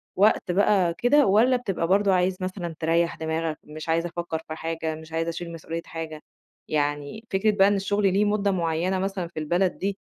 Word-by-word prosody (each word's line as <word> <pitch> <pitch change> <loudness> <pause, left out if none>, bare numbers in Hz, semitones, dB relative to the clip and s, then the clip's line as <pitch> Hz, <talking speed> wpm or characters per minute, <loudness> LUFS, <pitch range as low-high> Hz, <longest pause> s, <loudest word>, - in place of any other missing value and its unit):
وقت 200 -2 +3
بقى 190 -2 +3
كده، 285 +4 +4
والَّا 230 +6 +4
بتبقى 195 -8 -2
برضه 195 +1 +3
عايز 185 0 +1
مثلًا 185 -3 -4
تريح 165 +1 +1
دماغك، 160 0 -2
مش 155 +1 -9
عايز 165 +1 +2
أفكر 170 -1 -3
في 155 - -5
حاجة، 160 -1 -3
مش 160 0 -12
عايز 165 +1 -1
أشيل 170 0 -4
مسؤولية 165 0 -5
حاجة، 160 -2 -6 0.5
يعني 145 +7 -2
فكرة 205 +3 +3
بقى 195 -1 +4
إن 205 - +3
الشغل 195 0 +1
ليه 205 +2 +3
مدة 205 -1 +1
معينة 175 +1 0
مثلًا 190 -2 -2
في 165 - -7
البلد 175 +4 0
دي، 200 0 -2
175 Hz, 190 wpm, -25 LUFS, 160-195 Hz, 0.5 s, كده